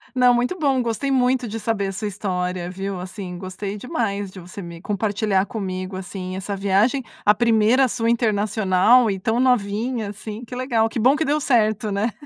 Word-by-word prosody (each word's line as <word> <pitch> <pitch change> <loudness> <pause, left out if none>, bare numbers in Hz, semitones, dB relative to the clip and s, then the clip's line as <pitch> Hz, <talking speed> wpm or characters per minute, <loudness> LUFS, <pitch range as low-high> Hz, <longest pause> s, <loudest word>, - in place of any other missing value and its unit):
Não, 250 -1 +5
muito 245 +10 0
bom, 275 -5 +2
gostei 240 +4 -1
muito 255 -1 +2
de 225 +2 -5
saber 210 -2 -1
a - - -3
sua 210 +2 -4
história, 180 -2 -3
viu, 195 0 -4
assim, 185 -1 -7
gostei 195 +2 -5
demais 205 - -2
de 185 - -10
você 180 +3 -9
me 170 0 -9
compartilhar 205 -1 0
comigo, 185 -4 -4
assim, 185 0 -6
essa 195 +1 -4
viagem, 205 +7 +2 0.2
a 210 0 +5
1ª 235 +3 +4
sua 230 -1 -1
internacional 215 0 +3
e 190 - -3
tão 225 +5 0
novinha 230 -2 +1
assim. 215 +2 -7
Que 245 +1 -8
legal. 235 -3 +1
Que 230 - -4
bom 260 +6 +5
que 320 - 0
deu 295 +2 +1
certo, 215 -5 +1
né? 210 +4 0
215 Hz, 185 wpm, -22 LUFS, 195-240 Hz, 0.2 s, Não